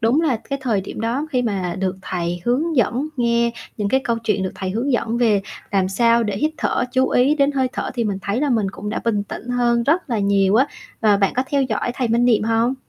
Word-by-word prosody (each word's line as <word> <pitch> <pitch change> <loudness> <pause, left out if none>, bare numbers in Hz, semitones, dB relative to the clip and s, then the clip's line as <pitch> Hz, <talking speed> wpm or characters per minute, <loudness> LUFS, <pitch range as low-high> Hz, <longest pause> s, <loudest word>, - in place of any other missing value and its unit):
đúng 240 +7 +3
là 290 -7 +1
cái 275 - -1
thời 220 -6 +1
điểm 195 - -7
đó 245 +7 -1
khi 250 -1 +1
mà 190 -6 -2
được 190 0 -1
thầy 175 -1 -3
hướng 295 +6 0
dẫn, 245 +6 +1
nghe 235 -1 +2 0.3
những 205 -2 -1
cái 265 +4 +2
câu 235 -1 0
chuyện, 205 -3 +1
được 185 - -3
thầy 190 -1 -4
hướng 245 +7 -1
dẫn 235 -1 0
về 215 -5 +3 0.3
làm 190 -2 +1
sao 235 +3 +3
để 205 -3 -2
hít 305 +9 +1
thở, 245 - 0
chú 260 0 +2
ý 265 +5 +3
đến 285 -1 +2
hơi 265 -2 +1
thở - - -3
thì 235 - -1
mình 200 -3 -1
thấy 205 +5 -1
là 290 -1 +1
mình 220 -5 +2
cũng 210 +1 -7
đã - - -2
bình 215 -3 +1
tĩnh 230 +4 -8
hơn 240 -1 +2
rất 300 +2 +1
là 230 - +1
nhiều 200 -1 +2
á, 260 +5 +4 0.3
và 210 -3 +4
bạn 195 -1 +1
có 255 - +1
theo 280 -1 +2
dõi 245 -1 -1
thầy 250 -3 -1
Minh 235 +2 +2
Niệm 230 -4 +3
hông? 230 +3 +1
235 Hz, 255 wpm, -21 LUFS, 205-255 Hz, 0.3 s, á